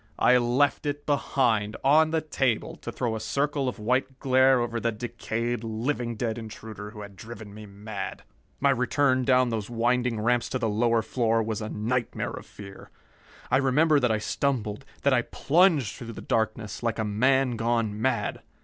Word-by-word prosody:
I 125 - +5
left 125 +5 +1
it 145 0 -3
behind, 120 -7 +1
on 155 +3 +5
the 160 0 0
table, 135 -7 -1
to - - -7
throw 115 -3 -2
a - - -3
circle 140 +4 -1
of 125 - -7
white 130 +4 -1
glare 130 -1 +4
over 120 -1 -2
the 115 0 0
decayed, 120 +1 -3
living 115 +2 -2
dead 115 +1 -2
intruder 110 -1 -8
who 105 0 -10
had 100 -1 -10
driven 105 +1 -10
me 105 0 -10
mad. 100 0 -7 0.4
My 140 0 +4
return 130 0 +2
down 130 -1 +4
those 110 -2 -3
winding 120 0 +1
ramps 120 +2 +1
to 130 - -1
the 120 -3 -1
lower 115 +1 +2
floor 115 -1 +1
was 110 0 -3
a 110 - -4
nightmare 120 +4 -2
of - - -9
fear. 100 -1 -12 0.6
I - - +5
remember 145 +3 +3
that 125 -2 +2
I 110 - +2
stumbled, 115 0 -2 0.2
that 140 - +4
I 125 - +4
plunged 155 - +2
through 115 -1 -8
the - - -8
darkness 110 -1 -2
like 115 -2 -1
a 110 - -1
man 130 +5 +2
gone 115 -2 -1
mad. 130 +2 0
120 Hz, 180 wpm, -26 LUFS, 110-130 Hz, 0.6 s, I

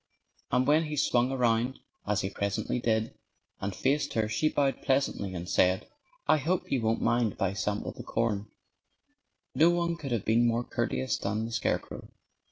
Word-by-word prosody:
And 125 +1 +2
when 155 +3 +4
he 150 -1 -4
swung 125 -2 +2
around, 120 0 +1 0.3
as 105 0 +1
he 95 - -3
presently 100 +5 -2
did, 110 -2 0 0.5
and 95 -1 -3
faced 140 +7 0
her 110 -1 +1
she 110 +8 +1
bowed 140 -3 0
pleasantly 130 -8 0
and 85 0 -5
said, 95 0 +2 0.4
"I - - +5
hope 170 +5 -1
you 130 - +1
won't 110 0 0
mind 120 -2 +2
if - - -16
I 95 0 +1
sample 100 +2 -2
the - - -9
corn." 110 -2 -1 1.0
No 160 +6 +5
one 170 -1 +1
could 145 -6 -6
have 115 -4 -1
been 115 +2 +4
more 120 +1 +1
courteous 65 - -1
than 105 +3 -1
the 115 - -6
scarecrow. 115 - -2
115 Hz, 175 wpm, -29 LUFS, 105-135 Hz, 1.0 s, I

